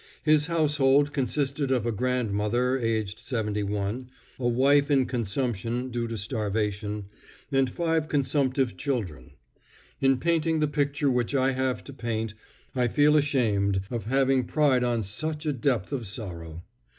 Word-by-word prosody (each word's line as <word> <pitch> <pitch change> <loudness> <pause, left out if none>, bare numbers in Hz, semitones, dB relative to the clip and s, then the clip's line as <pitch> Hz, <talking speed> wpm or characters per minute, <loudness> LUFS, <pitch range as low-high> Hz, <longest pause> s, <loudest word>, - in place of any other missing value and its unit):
His 155 -1 +4
household 145 -3 +3
consisted 140 0 -1
of 125 -4 +1
a 120 - +1
grandmother, 120 +1 0
aged 110 -3 -1
71, 105 0 -2 0.3
a 120 - 0
wife 140 +4 +3
in 135 -3 +4
consumption, 120 +1 -2
due 120 -1 -2
to 115 0 -4
starvation, 105 -1 -2 0.5
and 135 -1 +2
five 160 +2 0
consumptive 135 -3 +1
children. 100 - -3 0.7
In 135 -1 +3
painting 165 +2 +1
the 150 - +2
picture 145 -1 0
which 125 +2 0
I 135 0 +3
have 130 -1 -1
to 140 - -10
paint, 115 -4 -3 0.4
I 125 -1 +2
feel 150 +5 +4
ashamed 110 -10 +2
at 120 -2 -3
having 135 +1 +2
pried 140 -4 +2
on 120 -2 0
such 150 +10 -4
a 150 - +1
depth 125 -5 0
of 120 -6 -3
sorrow. 85 -6 -7
125 Hz, 140 wpm, -27 LUFS, 110-140 Hz, 0.7 s, His